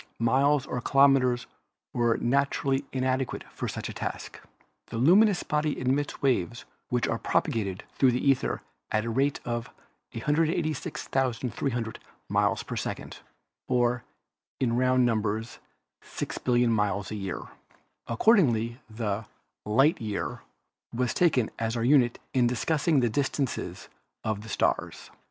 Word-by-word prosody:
Miles 135 +4 +3
or 125 - -3
kilometers 135 -3 +4 0.5
were 120 -1 +2
naturally 135 +1 +1
inadequate 130 0 -1
for - - -4
such - - -4
a - - -6
task. - - -5 0.5
A - - -5
luminous 185 - +5
body 150 0 -1
emits 135 +3 -1
waves 120 -4 0 0.2
which 125 -1 +1
are - - -1
propagated 100 -4 -1
through 130 -2 +4
the 125 - -1
ether 135 -2 +1 0.3
at 110 - +1
the 115 - -2
rate 135 +4 +1
of 120 -1 -3 0.4
186,300 135 -5 -1 0.3
miles - - +1
a - - -4
second, - - -5 0.5
or, 125 -1 +1 0.6
in 120 -3 +1
round 130 0 +3
num 115 -3 +2
bers, 110 +2 -3 0.4
six - - -5
billion 120 -1 +2
miles 100 -2 0
a - - -3
year. 95 -3 -4 0.6
Accordingly 120 - +3
the 110 -1 -3 0.4
"light 135 +9 +3
year" 105 -2 -3 0.5
was 125 0 -1
taken 140 -10 +2
as 115 +1 -1
our 115 - -1
unit 125 -2 +4 0.2
in 125 -2 +4
discussing 145 +4 +1
the 120 - +2
distances 135 +1 -2 0.4
of 110 -1 -2
the 110 - -10
stars. - - -1
125 Hz, 130 wpm, -28 LUFS, 115-140 Hz, 0.6 s, luminous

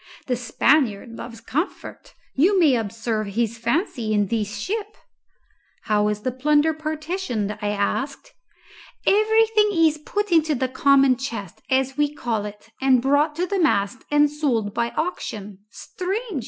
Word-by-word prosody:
The 250 - 0
Spaniard 245 -1 +1
loves 230 0 -9
comfort 300 - -5 0.2
you 370 +8 +3
may 300 -7 +5
observe 220 -1 -2
his 230 +2 -2
fancy 235 - -1
in 205 -1 +1
this 210 -2 -2
ship." 420 - -4 0.9
"How 210 -1 +2
is 210 0 -2
the 255 - -1
plunder 295 +4 +2
partitioned?" 310 - -3
I 210 - -1
asked. 270 - -2 0.7
"Everything 430 +1 +4
is 325 -4 +3
put 410 +6 -3
into 315 -2 +3
the 260 0 -1
common 275 -1 +4
chest, 225 -9 -6
as 265 +1 +1
we 295 -1 +2
call 225 -6 -2
it, 210 +2 -10
and 265 -1 +4
brought 285 +4 +2
to 350 +3 0
the 390 +2 -2
mast 225 - +1
and 295 0 +4
sold 265 -9 -1
by 235 +1 0
auction 210 - -4
Strange!" 385 - -4
265 Hz, 145 wpm, -23 LUFS, 225-320 Hz, 0.9 s, may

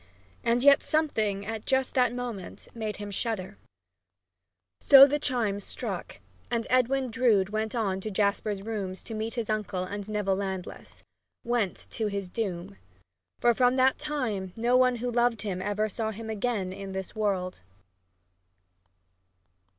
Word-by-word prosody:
And 235 +2 +2
yet 280 0 +7
something 220 -11 0
at 220 0 -5
just 265 -1 +1
that 250 -3 +3
moment 240 -6 -6
made 220 -2 -4
him 205 0 -6
shudder. 195 - -3 1.2
So 275 -1 +10
the 290 +1 0
chimes 220 -8 0
struck, - - -5 0.3
and 235 -1 -1
Edwin 255 0 +2
Drood 220 -5 +3
went 215 +2 -2
on 200 -5 0
to 215 - -4
Jasper's 200 0 0
rooms 200 -4 -4
to 225 - -7
meet 220 +2 -3
his 235 -3 -2
uncle 210 -4 -2
and 205 +2 -6
Neville 205 -3 0
Landless 180 - -6 0.4
went 235 -5 -1
to 220 - -1
his 200 -3 -4
doom! 180 - -4 0.6
For 240 - +4
from 250 +1 +3
that 260 0 +3
time 240 -12 -3
no 240 +2 +2
one 255 -1 +4
who 245 +1 -3
loved 240 -1 +1
him 185 -3 -3
ever 205 +2 0
saw 220 +1 -3
him 220 +1 -6
again 210 -4 -1
in 195 0 -7
this 190 0 -5
world! 190 - -1
215 Hz, 150 wpm, -28 LUFS, 195-245 Hz, 1.2 s, So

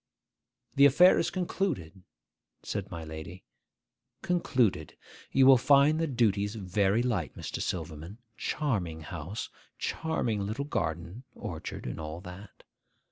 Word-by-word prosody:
'The 140 - +8
affair 175 +7 +6
is - - +1
concluded,' 170 - -2 0.6
said - - -4
my 85 -1 -6
lady; 80 +4 -8 0.8
'concluded. 130 - +1 0.3
You 135 - +5
will 130 -2 +8
find 145 +4 +5
the 165 - +1
duties 105 -5 +1
very 100 +2 +1
light, 100 - -1
Mr. - - -5
Silverman. 80 +7 -4 0.2
Charming 95 - -2
house; 85 +6 -6 0.3
charming 120 -10 -1
little 110 +8 -3
garden, 85 - -3
orchard, - - -6
and 60 - -5
all 80 +1 -5
that. 95 +2 -11
105 Hz, 120 wpm, -29 LUFS, 85-140 Hz, 0.8 s, The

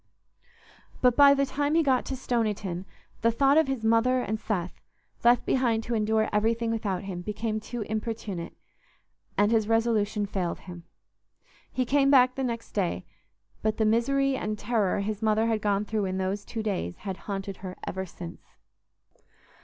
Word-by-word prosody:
But 250 -2 +4
by 280 0 +8
the 275 0 +2
time 285 +3 -1
he 330 - +4
got 260 -3 +2
to 270 - -2
Stoniton, 210 -8 -2 0.4
the 230 - +4
thought 275 +4 +3
of 320 - +2
his 265 -4 -2
mother 230 +3 +3
and 220 -3 -2
Seth, 185 -6 -3 0.4
left 240 0 +5
behind 235 -4 +1
to 240 - -3
endure 220 0 +2
everything 225 +2 +1
without 205 -5 -2
him, 185 -3 -5
became 215 +3 -2
too 225 +1 -5
importunate, 215 -4 -4 0.8
and 205 +1 +4
his 220 -2 +2
resolution 225 -2 +1
failed 190 -4 -3
him. 175 -2 -10 0.9
He 255 - 0
came 275 +2 +3
back 255 -2 +6
the 270 - -3
next 235 -2 -3
day, 175 - -1 0.6
but 215 0 0
the 220 - +2
misery 275 +5 +2
and 215 -4 -3
terror 210 -5 0
his 210 +1 -3
mother 220 0 +2
had 225 -2 0
gone 205 0 +1
through 210 -1 -1
in 185 0 -2
those 190 +2 -2
two 225 -2 -4
days 185 - -2
had 190 -2 -3
haunted 195 -1 -4
her 185 -1 -8
ever 190 0 -4
since. 170 0 -9
220 Hz, 170 wpm, -27 LUFS, 200-240 Hz, 0.9 s, by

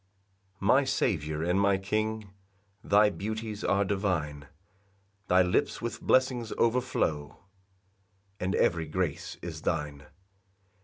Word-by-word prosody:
1 100 - -3
My 135 +6 +5
Saviour 80 - -1
and 90 +3 +2
my 100 -1 +3
King, 110 +1 -2 0.5
Thy 105 +1 +4
beauties 110 +1 -5
are 100 0 +2
divine; 85 -8 -2 0.8
Thy 90 0 +5
lips 90 +11 0
with 115 -2 -5
blessings 125 -3 +2
overflow, 115 - 0 1.0
And 95 +2 -1
every 85 -2 +1
grace 90 +2 -3
is - - -6
thine. 75 0 -3
100 Hz, 110 wpm, -29 LUFS, 85-110 Hz, 1.0 s, My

